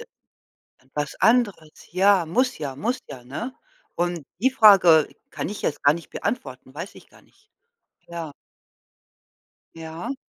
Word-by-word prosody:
D 470 - -9 0.8
etwas 145 +2 -4
anderes, 210 -10 +1
ja, 190 0 +4
muss 250 +9 +1
ja, 140 -4 -5
muss 240 - -2
ja, 125 -2 -9
ne? 220 - -6 0.4
Und 175 -2 -1 0.2
die 260 +4 +3
Frage 190 - +7 0.2
kann - - -4
ich 210 - -6
jetzt 150 - -2
gar 145 - +6
nicht 170 0 -8
beantworten, 130 - -5
weiß 170 +7 -7
ich - - -15
gar - - -20
nicht. 425 +2 -30 0.6
Ja. 170 -3 -6 1.4
Ja. 165 +9 -6
170 Hz, 140 wpm, -24 LUFS, 150-220 Hz, 1.4 s, Frage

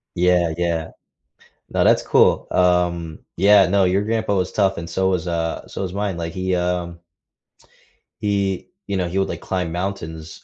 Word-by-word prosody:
Yeah, 90 -2 +2
yeah. 85 -2 -1 0.8
No, - - +1
that's - - +4
cool, - - +3
um, 85 -3 +1 0.2
yeah 100 +1 +6
no, 95 +2 +3
your 95 +2 +2
grandpa 110 -2 0
was 90 -1 -1
tough 100 -2 +1
and 85 0 -6
so 95 +2 0
was, 90 -3 -1
uh 85 -1 -2
so - - -6
was 90 -1 -4
mine, 100 -3 -2
like, 85 -1 -4
he, 95 +1 -1
um 90 -1 -2 1.2
he, 100 -2 -1 0.2
you 100 - -1
know 90 -2 -1
he 90 +3 -4
would, 95 - 0
like, - - -5
climb 90 -3 -2
mountains, 80 -3 -5
90 Hz, 175 wpm, -21 LUFS, 85-95 Hz, 1.2 s, yeah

